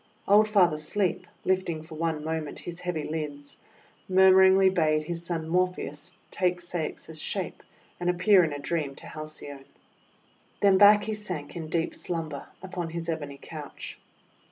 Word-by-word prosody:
Old 210 +2 +6
Father 180 -7 +3
Sleep, 185 +2 -1 0.2
lifting 185 -4 0
for 160 0 -12
one 160 -1 -2
moment 160 -1 -3
his 175 0 -8
heavy 175 -4 -3
lids, 150 -2 -5 0.5
murmuringly 190 0 +6
bade 155 -4 +2
his 170 +2 -4
son 165 -2 -3
Morpheus 180 +2 -2
take 180 -1 +1
Ceyx's 160 -2 -5
shape, - - -3 0.4
and 175 0 0
appear 180 +2 +5
in 160 - 0
a 145 - -4
dream 145 -1 -2
to - - -10
Halcyone. 155 -3 -8 0.9
Then 195 -2 +5
back 205 0 +8
he 220 - -2
sank 180 -9 -5
in 160 -2 -5
deep 165 0 0
slumber 160 -5 -4 0.2
upon 180 -3 -4
his 170 0 -5
ebony 145 -4 -4
couch. 150 -3 -9
170 Hz, 150 wpm, -27 LUFS, 155-185 Hz, 0.9 s, back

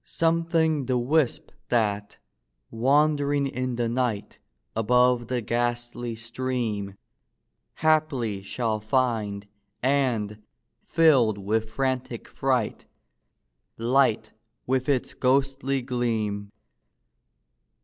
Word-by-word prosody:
Something 165 -3 +1
the 130 -1 +1
wisp 135 +2 +1 0.2
that, 105 -3 0 0.5
wandering 145 +3 +2
in 130 -2 -2
the 120 0 0
night, 120 -3 -2 0.4
Above 125 +1 +3
the 125 0 -1
ghastly 120 0 -2
stream, 115 -4 -3 0.9
Haply 150 -10 +1
shall 110 +2 -2
find; 110 -4 -1 0.4
and, 120 -6 0 0.5
filled 135 -10 +4
with 110 +3 -1
frantic 130 0 -2
fright, 130 -5 -1 0.9
Light 115 -2 +2 0.3
with 130 +1 0
its 135 -3 0
ghostly 135 0 +1
gleam. 110 -5 -2
125 Hz, 85 wpm, -26 LUFS, 110-135 Hz, 0.9 s, filled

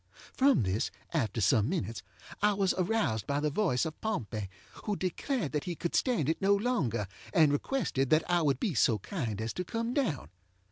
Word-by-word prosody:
From 270 - +4
this, 95 +3 0 0.2
after 115 -8 0
some 105 +3 +3
minutes, 115 - -2 0.4
I 210 0 +4
was 195 -2 +1
aroused 175 - 0
by 140 0 0
the 150 0 0
voice 165 -6 +1
of 160 -1 -6
Pompey, 110 - -3 0.4
who 210 - 0
declared 190 - -2
that 150 -2 -2
he 175 - -3
could 170 - -3
stand 235 - +1
it 160 - 0
no 200 +1 +4
longer, 160 - 0 0.3
and 155 -3 +6
requested 145 - 0
that 155 +1 +3
I 175 -1 +2
would 140 -4 +1
be 190 - 0
so 115 -5 +3
kind 110 - -4
as 110 +1 -3
to 180 - -3
come 230 +6 -3
down. 160 - -1
160 Hz, 190 wpm, -30 LUFS, 120-200 Hz, 0.4 s, and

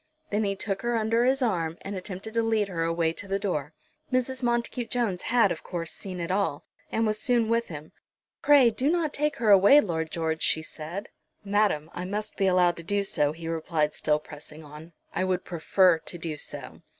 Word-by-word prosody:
Then 210 +1 +1
he 200 0 0
took 195 0 -3
her 240 0 0
under 225 +2 +2
his 265 +1 +2
arm, 170 -8 -1
and 200 +1 -5
attempted 190 +3 -6
to 230 - +2
lead 220 -3 +1
her 170 -3 -3
away 165 0 0
to 200 - -8
the 195 0 0
door. 160 -7 -3 0.4
Mrs. 255 +1 0
Montacute 240 0 -1
Jones 225 -8 -1
had, 230 -5 +3
of - - -4
course, 165 -3 -5
seen 185 -2 -7
it 170 +1 -3
all, 190 -7 -1 0.3
and 225 - +1
was 215 0 0
soon 240 -3 +2
with 230 0 +1
him. 155 -2 -9 0.5
"Pray, 280 -5 +6
do 260 +6 0
not 330 -3 0
take 300 +1 0
her 225 -3 +2
away, 200 +9 +8
Lord 160 - -1
George," 160 -1 -2
she 160 - +1
said. 165 +6 -7 0.4
"Madam, 200 -6 +1
I 180 - -5
must 210 +3 -4
be 195 - +1
allowed 180 -2 +3
to 170 - -6
do 200 +3 0
so," 150 -6 +1
he 165 +1 -8
replied, 160 -2 -1
still 150 0 +1
pressing 150 +1 -11
on. 150 +3 -12 0.2
"I - - 0
would 185 -1 -1
prefer 175 0 +3
to 175 - -6
do 165 -2 -4
so." 150 - -7
190 Hz, 210 wpm, -27 LUFS, 165-225 Hz, 0.5 s, away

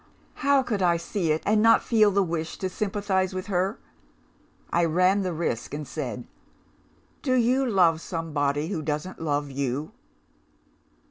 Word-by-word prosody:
How 280 -2 +4
could 215 -6 -2
I 175 -2 +3
see 170 -1 -2
it, 155 - 0
and 210 0 +3
not 225 +1 +5
feel 215 -3 +4
the 200 0 +2
wish 165 -2 -3
to 190 - -3
sympathise 190 -1 -1
with 185 0 -4
her? 190 +2 -1 0.9
I 170 - +2
ran 180 +4 +3
the 185 -2 -2
risk, 160 -6 -3
and 150 -1 -6
said, 125 -6 -5 1.0
'Do 255 -2 +1
you 255 +2 +2
love 170 -6 +3
somebody, 150 -3 -2
who 180 -6 -2
doesn't 155 +4 -4
love 145 -2 -1
you? 140 - -3
180 Hz, 150 wpm, -26 LUFS, 155-205 Hz, 1.0 s, not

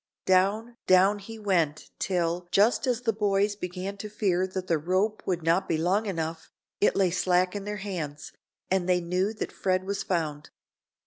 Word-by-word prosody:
Down, 205 +6 +2
down 190 +3 +5
he 225 +3 -9
went 170 -8 0
till, 175 -1 -1
just 220 +8 +3
as 245 -1 +1
the 230 -2 +1
boys 205 -1 +1
began 185 +1 -5
to 210 +1 -6
fear 190 -3 0
that 185 -1 -4
the 165 -3 +1
rope 190 +7 0
would 175 -3 -1
not 170 +4 +2
be 160 - +2
long 190 +7 +1
enough, 165 -3 -4 0.3
it 205 - +3
lay 190 -3 +3
slack 180 +1 +2
in 200 -1 -4
their 210 0 -3
hands, 160 -8 -5 0.4
and 185 -1 +1
they 180 -1 +4
knew 180 +4 0
that 215 - -5
Fred 185 -1 0
was 200 +1 -3
found. 155 -5 -2
185 Hz, 180 wpm, -27 LUFS, 175-205 Hz, 0.4 s, down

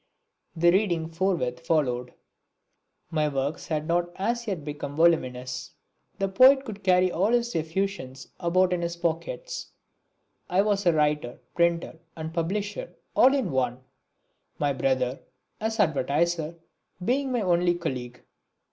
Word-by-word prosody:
The 170 +1 +5
reading 175 -4 +1
forthwith 165 -8 0
followed. 125 -7 0 1.0
My 155 -2 +1
works 140 +1 -2
had 155 -1 -2
not 175 0 +1
as 235 +4 -2
yet 180 -8 -3
become 145 -1 -5
voluminous. 130 -6 +1 0.4
The 195 - 0
poet 260 +8 +6
could 210 -3 -8
carry 185 -1 +4
all 195 +7 +1
his 240 0 +1
effusions 160 -5 -3
about 180 +1 +2
in 175 - -1
his 170 0 -2
pockets. - - -3 0.8
I 185 +2 +3
was 200 -2 +1
writer, 150 -6 +1
printer 170 -1 +1 0.2
and 160 0 -6
publisher, 205 - -3 0.2
all 265 +2 +6
in 255 - 0
one; 125 -1 0 0.8
my 145 -1 +1
brother, 130 -1 0 0.4
as 220 +1 -2
advertiser, 160 0 +1 0.5
being 265 +3 +1
my 245 -2 +1
only 175 -2 +2
colleague. 125 -8 -5
170 Hz, 130 wpm, -26 LUFS, 150-195 Hz, 1.0 s, poet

